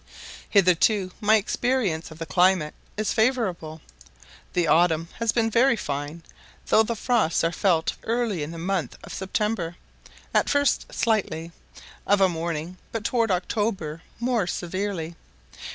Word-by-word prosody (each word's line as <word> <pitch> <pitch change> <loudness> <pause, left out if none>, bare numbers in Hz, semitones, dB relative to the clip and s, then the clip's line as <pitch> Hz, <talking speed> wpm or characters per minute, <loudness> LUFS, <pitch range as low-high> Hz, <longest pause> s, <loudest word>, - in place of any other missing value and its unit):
Hitherto 190 0 +3
my 215 +1 +5
experience 215 -6 0
of 160 - -11
the 165 - -5
climate 175 0 +3 0.2
is 215 0 0
favourable. 190 - 0 0.7
The 175 -1 +2
autumn 165 +1 +3
has 230 -1 +2
been 225 -1 +1
very 255 +3 +4
fine, 145 -2 -4 0.4
though 220 - +5
the 230 +1 -1
frosts 220 -7 +1
are 165 - +2
felt 170 -2 +1
early 230 -6 -1
in 145 - -3
the 165 - -7
month 175 -5 -2
of - - -9
September; 190 -2 -2 0.6
at - - +3
first 285 -2 +1
slightly, 170 -7 -1 0.6
of 205 0 +4
a 190 - +6
morning, 170 0 -4
but 225 -2 -3
towards 230 -1 +1
October 180 -4 -1 0.2
more 235 -5 0
severely. 175 -2 -3
185 Hz, 135 wpm, -25 LUFS, 165-220 Hz, 0.7 s, a